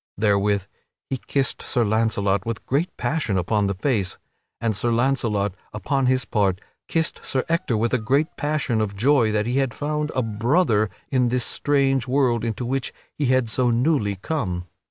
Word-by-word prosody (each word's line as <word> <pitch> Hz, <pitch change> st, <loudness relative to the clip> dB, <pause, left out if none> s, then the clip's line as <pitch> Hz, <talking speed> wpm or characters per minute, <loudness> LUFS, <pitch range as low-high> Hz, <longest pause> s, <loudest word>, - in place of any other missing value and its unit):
Therewith 100 Hz, -1 st, +2 dB, 0.5 s
he 135 Hz, -, 0 dB
kissed 135 Hz, -2 st, 0 dB
Sir 120 Hz, -, 0 dB
Launcelot 105 Hz, -3 st, +1 dB
with 115 Hz, 0 st, -5 dB
great 150 Hz, +7 st, 0 dB
passion 120 Hz, -5 st, 0 dB
upon 100 Hz, +3 st, +1 dB
the 100 Hz, -, -1 dB
face. 100 Hz, -3 st, -1 dB, 0.4 s
And 115 Hz, -2 st, 0 dB
Sir 120 Hz, +4 st, 0 dB
Launcelot 115 Hz, -5 st, +1 dB, 0.2 s
upon 130 Hz, +6 st, 0 dB
his 130 Hz, -1 st, +2 dB
part 100 Hz, -3 st, +1 dB, 0.3 s
kissed 160 Hz, -1 st, -1 dB
Sir 130 Hz, -, -1 dB
Ector 165 Hz, -8 st, 0 dB
with 115 Hz, +3 st, 0 dB
a 130 Hz, -, +3 dB
great 140 Hz, +8 st, +1 dB
passion 145 Hz, -7 st, 0 dB
of 100 Hz, -2 st, -2 dB
joy 120 Hz, +1 st, +3 dB
that 105 Hz, 0 st, 0 dB
he 125 Hz, +3 st, 0 dB
had 135 Hz, -4 st, 0 dB
found 150 Hz, 0 st, -2 dB
a 130 Hz, -, +1 dB
brother 110 Hz, -, +2 dB, 0.2 s
in 125 Hz, -3 st, +2 dB
this 125 Hz, 0 st, 0 dB
strange 135 Hz, -4 st, +1 dB
world 125 Hz, -3 st, +2 dB
into 115 Hz, +1 st, -2 dB
which 135 Hz, +2 st, -2 dB, 0.2 s
he 145 Hz, -, 0 dB
had 130 Hz, -1 st, +3 dB
so 125 Hz, +2 st, +1 dB
newly 120 Hz, -4 st, +1 dB
come. 95 Hz, -, -3 dB
120 Hz, 175 wpm, -23 LUFS, 105-135 Hz, 0.5 s, a